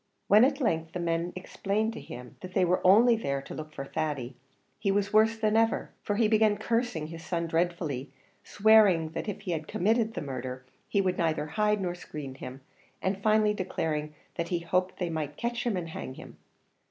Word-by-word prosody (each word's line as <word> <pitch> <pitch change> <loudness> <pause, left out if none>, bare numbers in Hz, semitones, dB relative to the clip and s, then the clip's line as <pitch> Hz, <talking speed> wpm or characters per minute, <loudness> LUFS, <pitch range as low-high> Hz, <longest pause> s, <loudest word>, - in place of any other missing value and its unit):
When 210 +3 +7
at 275 +2 +3
length 165 - 0
the 180 - -3
men 170 0 -1
explained 205 +4 -2
to - - -7
him 125 0 -10
that 185 0 -9
they 185 - +4
were 180 +1 +2
only 225 +6 +7
there 140 -11 -2
to - - -8
look 155 0 -7
for 140 -2 -6
Thady, 135 -4 -3 0.4
he 210 -2 0
was 200 +1 +1
worse 220 +1 +5
than 215 -1 +1
ever; 225 0 +2
for 205 - -1
he 220 +1 +3
began 215 -1 +3
cursing 230 -7 -1
his 165 +1 -8
son 170 -1 -2
dreadfully, 165 -5 -1 0.3
swearing 205 -6 +5
that 170 - -4
if 200 - -5
he 195 -3 -4
had 155 -2 -3
committed 220 +3 +1
the - - -2
murder, 130 -2 -5 0.2
he 200 - +2
would 185 -1 0
neither 160 -3 +1
hide 210 +6 +1
nor 180 -2 -1
screen 150 -6 -7
him, 130 0 -9 0.4
and 190 +1 -2
finally 215 0 +3
declaring 155 -6 -2 0.2
that 170 - -1
he 175 - +1
hoped 185 +2 0
they 175 -2 -2
might 150 -2 -3
catch 240 +1 -2
him 215 -5 +1
and 170 -2 -4
hang 130 -4 -6
him. - - -12
180 Hz, 200 wpm, -29 LUFS, 155-215 Hz, 0.4 s, When